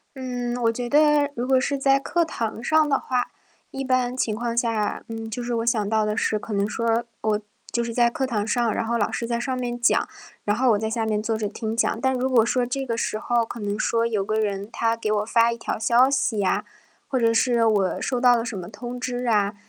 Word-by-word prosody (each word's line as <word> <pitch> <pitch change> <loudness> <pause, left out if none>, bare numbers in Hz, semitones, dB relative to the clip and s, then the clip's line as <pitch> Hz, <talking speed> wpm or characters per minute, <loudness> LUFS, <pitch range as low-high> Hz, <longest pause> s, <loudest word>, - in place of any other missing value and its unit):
嗯， 245 -2 -3
我 230 -1 +3
觉 240 +1 -4
得 295 +1 +4
如 245 +1 -3
果 260 -1 +4
是 280 +2 -1
在 275 0 +3
课 340 +5 0
堂 230 -7 -4
上 310 +3 +3
的 275 -2 +2
话， 250 -1 -2 0.4
一 270 - -4
般 255 -1 +1
情 225 -4 -1
况 235 +1 -3
下， 225 -3 0
嗯， 225 0 -6
就 220 +3 -5
是 240 0 -2
我 230 0 -1
想 215 -4 +1
到 220 -1 +2
的 210 0 -1
是 215 - 0
可 210 +1 -6
能 200 +1 0
说， 230 +1 0 0.2
我 215 -1 0 0.3
就 235 - 0
是 235 - -4
在 240 -1 +4
课 265 +1 -2
堂 210 -4 -1
上， 235 0 +1
然 230 - -1
后 235 - -1
老 205 - 0
师 235 - -3
在 235 0 -1
上 260 +1 -2
面 240 -1 -3
讲， 235 - +3 0.4
然 205 - +2
后 255 +2 +2
我 205 - +2
在 220 - -2
下 225 0 -1
面 215 -1 0
坐 220 +1 -1
着 220 -1 -2
听 220 +2 -4
讲。 230 - +1
但 265 +2 +1
如 255 +1 0
果 235 -4 +4
说 250 +1 +1
这 265 +2 -2
个 230 - -2
时 225 - -1
候 235 +1 +1
可 230 - -7
能 205 0 -3
说 230 0 +1
有 220 -4 0
个 215 +2 -2
人 205 -1 -1
他 230 0 0
给 220 -2 -2
我 210 0 +1
发 230 +1 +3
一 235 - -4
条 - - -4
消 235 +3 +4
息 225 -7 +1
啊， 205 - +1 0.4
或 260 - 0
者 230 -1 +3
是 235 0 +3
我 205 -4 +2
收 250 -2 -2
到 245 -1 +6
了 230 -1 -1
什 240 - -5
么 180 -2 -6
通 240 +3 -7
知 245 0 -3
啊， 205 -3 +2
235 Hz, 270 characters per minute, -24 LUFS, 220-250 Hz, 0.4 s, 到